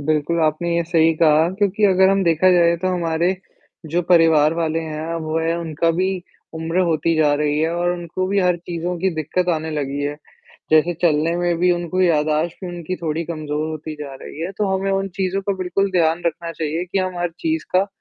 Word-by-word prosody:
बिल्कुल 155 Hz, +3 st, 0 dB
आपने 165 Hz, +2 st, 0 dB
ये 170 Hz, -, +2 dB
सही 165 Hz, -1 st, +3 dB
कहा 155 Hz, 0 st, +4 dB
क्योंकि 205 Hz, +1 st, +1 dB
अगर 190 Hz, -1 st, +5 dB
हम 195 Hz, 0 st, +2 dB
देखा 170 Hz, +2 st, +4 dB
जाए 170 Hz, -1 st, +4 dB
तो 185 Hz, -, +1 dB
हमारे, 175 Hz, 0 st, 0 dB, 0.5 s
जो 170 Hz, +3 st, 0 dB
परिवार 165 Hz, -3 st, +4 dB
वाले 165 Hz, -1 st, -1 dB
हैं 160 Hz, +1 st, -5 dB
वह 160 Hz, +1 st, -1 dB
उनका 165 Hz, -1 st, -1 dB
भी 185 Hz, +1 st, +2 dB, 0.5 s
उम्र 160 Hz, +2 st, -2 dB
होती 165 Hz, +1 st, +1 dB
जा 155 Hz, -2 st, +3 dB
रही 150 Hz, 0 st, 0 dB
है 160 Hz, +1 st, +1 dB
और 175 Hz, 0 st, 0 dB
उनको 175 Hz, +1 st, -3 dB
भी 200 Hz, +2 st, 0 dB
हर 180 Hz, -1 st, +2 dB
चीज़ों 175 Hz, +1 st, -4 dB
की 190 Hz, +2 st, +1 dB
दिक़्क़त 160 Hz, +4 st, -1 dB
आने 160 Hz, 0 st, -4 dB
लगी 145 Hz, -2 st, -3 dB
है। 145 Hz, +1 st, -2 dB, 0.5 s
जैसे 155 Hz, +3 st, +4 dB
चलने 160 Hz, 0 st, +2 dB
में 175 Hz, -1 st, 0 dB
भी 180 Hz, +1 st, +3 dB
उनको 175 Hz, +1 st, -2 dB
याददाश्त 155 Hz, -1 st, +1 dB
भी -, -, -4 dB
उनकी 175 Hz, +1 st, -5 dB
थोड़ी 165 Hz, 0 st, -3 dB
कमज़ोर 155 Hz, -2 st, -3 dB
होती 155 Hz, 0 st, -6 dB
जा 145 Hz, -2 st, -7 dB
रही 155 Hz, -, -9 dB
है। 170 Hz, +3 st, -3 dB
तो 210 Hz, -, +1 dB
हमें 195 Hz, +1 st, -2 dB
उन 195 Hz, 0 st, 0 dB
चीज़ों 190 Hz, 0 st, -1 dB
का 200 Hz, -, -1 dB
बिल्कुल 190 Hz, +2 st, -1 dB
ध्यान 165 Hz, -1 st, +2 dB
रखना 170 Hz, 0 st, -3 dB
चाहिए 160 Hz, +2 st, -3 dB
कि -, -, +1 dB
हम 185 Hz, -1 st, -2 dB
हर 175 Hz, 0 st, -1 dB
चीज़ 320 Hz, -1 st, -1 dB
का 190 Hz, +2 st, +4 dB
170 Hz, 205 wpm, -20 LUFS, 155-180 Hz, 0.5 s, अगर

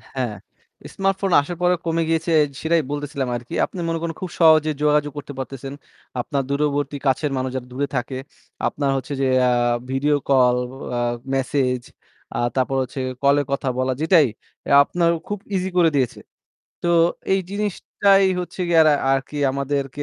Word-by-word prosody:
হ্যাঁ। 120 Hz, -5 st, -2 dB, 0.6 s
smartphone 195 Hz, -1 st, 0 dB
আসার 170 Hz, +4 st, -6 dB
পরে 180 Hz, 0 st, +3 dB
কমে 165 Hz, 0 st, +1 dB
গিয়েছে 165 Hz, +1 st, 0 dB, 0.3 s
সেটাই 165 Hz, 0 st, +2 dB
বলতেছিলাম 145 Hz, -2 st, -3 dB
আরকি। 120 Hz, 0 st, -7 dB
আপনি 185 Hz, -, -9 dB
মনে 165 Hz, 0 st, -1 dB
করেন 165 Hz, -1 st, -3 dB
খুব 185 Hz, -, -4 dB
সহজে 155 Hz, -1 st, +6 dB
যোগাযোগ 150 Hz, 0 st, +2 dB
করতে 145 Hz, 0 st, -7 dB
পারতেছেন। 135 Hz, +1 st, -6 dB, 0.5 s
আপনার 140 Hz, +2 st, -2 dB
দূরবর্তী 145 Hz, 0 st, 0 dB
কাছের 135 Hz, +2 st, +1 dB
মানুষ 130 Hz, 0 st, -1 dB
যারা 125 Hz, -1 st, -4 dB
দূরে 140 Hz, +2 st, -1 dB
থাকে, 125 Hz, +1 st, -2 dB, 0.5 s
আপনার 140 Hz, -1 st, -1 dB
হচ্ছে 135 Hz, +2 st, -5 dB
যে 135 Hz, -, +2 dB, 0.2 s
আ -, -, +3 dB, 0.4 s
video 145 Hz, +3 st, +2 dB
call, 125 Hz, -2 st, +4 dB, 0.4 s
আ -, -, 0 dB, 0.4 s
message 130 Hz, -2 st, 0 dB, 0.5 s
আ -, -, -1 dB, 0.2 s
তারপর 130 Hz, 0 st, 0 dB
হচ্ছে 130 Hz, +1 st, -7 dB, 0.2 s
কলে 140 Hz, +1 st, +4 dB
কথা 140 Hz, 0 st, -1 dB
বলা 130 Hz, 0 st, +1 dB
যেটাই 160 Hz, -3 st, +5 dB, 0.4 s
এ -, -, -1 dB
আপনার 170 Hz, +3 st, +1 dB, 0.2 s
খুব 205 Hz, -1 st, -3 dB, 0.2 s
easy 190 Hz, 0 st, -1 dB
করে 170 Hz, -2 st, +5 dB
দিয়েছে। 130 Hz, -4 st, 0 dB, 0.6 s
তো 175 Hz, -, 0 dB, 0.4 s
এই 195 Hz, -, +3 dB
জিনিসটাই 200 Hz, -1 st, +2 dB
হচ্ছে 180 Hz, +1 st, -7 dB
গিয়ে 165 Hz, -1 st, +5 dB
আরা 155 Hz, -, +5 dB, 0.2 s
আরকি 135 Hz, +2 st, -2 dB, 0.2 s
আমাদেরকে 140 Hz, +1 st, -2 dB
145 Hz, 160 wpm, -22 LUFS, 135-165 Hz, 0.6 s, সহজে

